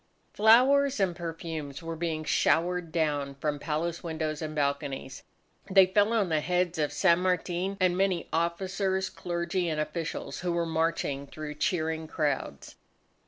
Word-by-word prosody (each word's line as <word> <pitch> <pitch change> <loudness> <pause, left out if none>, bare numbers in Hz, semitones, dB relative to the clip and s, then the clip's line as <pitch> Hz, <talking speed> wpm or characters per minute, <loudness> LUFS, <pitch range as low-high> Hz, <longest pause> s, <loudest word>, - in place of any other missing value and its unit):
Flowers 255 +5 +5
and 185 -3 +1
perfumes 165 -4 -6
were 165 0 -4
being 160 -1 -2
showered 170 +2 +1
down 145 -4 -1
from 145 +1 -2
palace 165 +3 -2
windows 160 -2 -3
and 155 -1 -4
balconies. 140 -2 -2 0.5
They 190 0 +7
fell 205 +3 +2
on 210 -5 +2
the 155 -1 +2
heads 180 0 0
of 150 -1 +1
San 170 +4 +3
Martin 180 +1 -1
and 185 -1 +3
many 190 -2 0
officers, 190 +3 -1
clergy, 175 0 -2
and 155 -1 -2
officials 165 +1 -4
who 180 -1 -1
were 170 0 0
marching 160 -4 -1
through 155 +1 -7
cheering 160 +1 -1
crowds. 145 - -3
170 Hz, 145 wpm, -28 LUFS, 155-185 Hz, 0.5 s, They